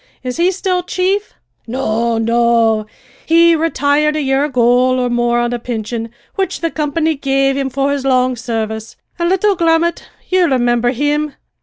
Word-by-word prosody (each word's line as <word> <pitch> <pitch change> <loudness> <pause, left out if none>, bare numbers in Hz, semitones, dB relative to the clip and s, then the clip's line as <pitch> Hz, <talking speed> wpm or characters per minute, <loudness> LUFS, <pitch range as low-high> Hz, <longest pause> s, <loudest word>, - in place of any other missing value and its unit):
"Is 250 -1 -4
he 345 +2 +3
still 370 -1 -1
chief?" 375 +3 -1 0.3
"No, 230 -1 -1
no; 230 -1 +2 0.4
he 335 +1 +4
retired 300 -1 +1
a 305 - -1
year 270 +1 +1
ago 250 -1 +2
or 250 -1 -1
more 240 0 +1
on 240 0 0
a 240 - -2
pinsion 230 -1 -4 0.2
which 385 -1 -2
the 330 -1 -1
company 315 +1 0
gave 275 -1 0
him 270 -1 -1
for 275 +2 -1
his 280 -1 -2
long 255 -1 +2
service; 220 -2 -4 0.2
an' 340 0 +1
little 385 +2 +2
Grummet 335 0 +1 0.2
ye 370 - +1
rimimber 245 -6 +2
him? 290 +2 -1
270 Hz, 160 wpm, -16 LUFS, 240-325 Hz, 0.4 s, he